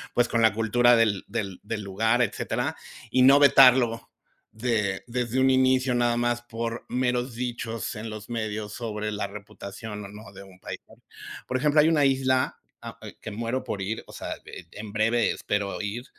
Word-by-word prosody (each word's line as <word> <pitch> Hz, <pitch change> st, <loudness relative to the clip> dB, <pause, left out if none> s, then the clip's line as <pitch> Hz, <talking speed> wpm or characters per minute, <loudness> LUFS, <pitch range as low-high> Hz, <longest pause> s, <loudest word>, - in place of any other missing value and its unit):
pues, 120 Hz, 0 st, +3 dB
con 115 Hz, -, 0 dB
la 110 Hz, -2 st, +5 dB
cultura 120 Hz, +2 st, +4 dB
del 110 Hz, -4 st, +2 dB
del 100 Hz, -4 st, -4 dB
del 110 Hz, 0 st, -4 dB
lugar, 110 Hz, +5 st, +1 dB
etcétera, 115 Hz, -, -2 dB, 0.4 s
y 130 Hz, -, +3 dB
no 135 Hz, +2 st, +8 dB
vetarlo 130 Hz, -4 st, +5 dB, 0.4 s
de 110 Hz, -4 st, -1 dB
desde 125 Hz, +1 st, -2 dB
un 130 Hz, 0 st, +4 dB
inicio 130 Hz, -1 st, +3 dB
nada 120 Hz, -1 st, +2 dB
más 120 Hz, 0 st, 0 dB
por 115 Hz, 0 st, -5 dB
meros 125 Hz, -1 st, -1 dB
dichos 115 Hz, -3 st, -4 dB
en 110 Hz, +1 st, -6 dB
los 110 Hz, +2 st, -8 dB
medios 110 Hz, -2 st, -3 dB
sobre 105 Hz, -2 st, -4 dB
la 105 Hz, -1 st, -3 dB
reputación 105 Hz, +1 st, -8 dB
o -, -, -7 dB
no 105 Hz, -1 st, -12 dB
de 95 Hz, -, -11 dB
un 95 Hz, -1 st, -15 dB
país. -, -, -7 dB, 0.7 s
Por 130 Hz, -, -1 dB
ejemplo, 150 Hz, +2 st, +3 dB
hay 155 Hz, -, +6 dB
una 150 Hz, -3 st, +3 dB
isla, 130 Hz, -1 st, +1 dB, 0.2 s
a -, -, -9 dB
e -, -, -10 dB
que -, -, -6 dB
muero 115 Hz, +4 st, -3 dB
por 100 Hz, -, -4 dB
ir, 110 Hz, +4 st, -3 dB
o -, -, -13 dB
sea, -, -, -5 dB
e 85 Hz, -, -10 dB
en 105 Hz, 0 st, -8 dB
breve 115 Hz, +2 st, +2 dB
espero 105 Hz, -1 st, -2 dB
ir, 105 Hz, +4 st, -4 dB
115 Hz, 185 wpm, -26 LUFS, 105-125 Hz, 0.7 s, no